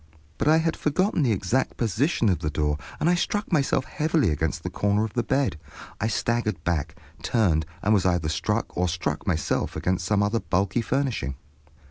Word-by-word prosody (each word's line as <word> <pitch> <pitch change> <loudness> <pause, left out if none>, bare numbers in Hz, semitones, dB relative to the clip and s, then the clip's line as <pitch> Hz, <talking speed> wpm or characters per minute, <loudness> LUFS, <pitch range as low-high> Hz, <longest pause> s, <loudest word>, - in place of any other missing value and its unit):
But - - 0
I 155 +1 +6
had 165 0 +1
forgotten 185 +5 +1
the 130 -5 +3
exact 105 +6 0
position 120 - +1
of 90 - +1
the 75 - -2
door, 75 0 0 0.2
and - - +1
I 175 - +5
struck 205 +4 -1
myself 140 -4 +2
heavily 155 - +1
against 80 +2 -2
the 90 - -4
corner 100 +3 +1
of 110 - -7
the 120 - +1
bed. 120 - 0 0.4
I 110 - 0
staggered 110 -5 -1
back, 80 -2 -1 0.3
turned, 85 -10 +1 0.2
and 105 - +3
was 100 -4 +3
either 90 -4 +1
struck 75 - -1
or 90 0 +1
struck 80 -4 -3
myself 80 -4 0
against 95 0 -1
some 105 0 +2
other 105 +3 +1
bulky 95 +4 0
furnishing. 115 - -1
105 Hz, 185 wpm, -25 LUFS, 85-130 Hz, 0.4 s, I